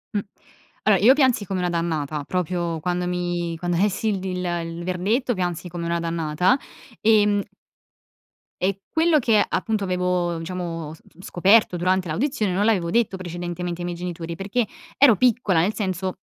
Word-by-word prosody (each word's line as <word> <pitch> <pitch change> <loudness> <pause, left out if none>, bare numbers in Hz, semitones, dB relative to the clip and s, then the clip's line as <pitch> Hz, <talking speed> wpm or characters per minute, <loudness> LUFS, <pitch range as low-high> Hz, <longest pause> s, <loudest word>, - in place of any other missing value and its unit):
Mh. - - +3 0.6
Allora, 195 -4 +4
io 250 +5 +8
piansi 255 -7 +2
come 185 0 -3
una 180 - 0
dannata, 155 -4 -2
proprio 175 -2 -2
quando 180 +2 -1
mi 175 -1 -2
quando 175 0 -2
lessi 205 +3 +1
il 185 -2 -2
il 170 -1 -3
verdetto 205 +8 0
piansi 180 -2 -3
come 170 0 -5
una 170 0 0
dannata. 165 - +1 0.4
Ehm 210 -2 +4 1.2
e 195 +1 0
quello 320 -1 +3
che 220 -4 +3
appunto 215 -3 -1
avevo, 180 -2 0
diciamo, 165 -2 -5
s - - -15 0.2
scoperto 190 +2 +3
durante 185 +1 +1
l'audizione 215 - -1
non 205 +3 +1
l'avevo 185 -7 +2
detto 215 -2 +1
precedentemente 175 0 -5
ai - - -3
miei 175 -1 -4
genitori 170 -1 -5
perché 205 +6 -1 0.3
ero 260 -6 +7
piccola, 230 -8 +3
nel 195 +6 +2
senso 185 -2 -3
180 Hz, 155 wpm, -23 LUFS, 170-205 Hz, 1.2 s, io